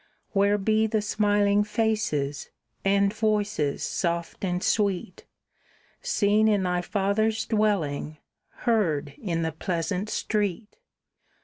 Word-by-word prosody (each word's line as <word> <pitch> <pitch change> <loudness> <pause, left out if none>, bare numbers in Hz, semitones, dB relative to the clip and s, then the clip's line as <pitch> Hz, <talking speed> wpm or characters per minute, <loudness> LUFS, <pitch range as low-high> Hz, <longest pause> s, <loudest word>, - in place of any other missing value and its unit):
"Where 200 0 +3
be 215 +2 +2
the 220 0 0
smiling 205 -1 +2
faces, 210 -10 -1 0.3
and 200 +1 +3
voices 210 -9 0
soft 170 0 -2
and 180 -1 -1
sweet, 205 0 0 0.8
Seen 215 - +2
in 205 -3 +2
thy 180 -1 0
father's 215 +4 0
dwelling, 190 -9 0 0.5
heard 165 - +1
in 170 -5 -1
the 160 - -1
pleasant 180 +4 -2
street? 210 -1 -2
200 Hz, 105 wpm, -26 LUFS, 175-215 Hz, 0.8 s, Where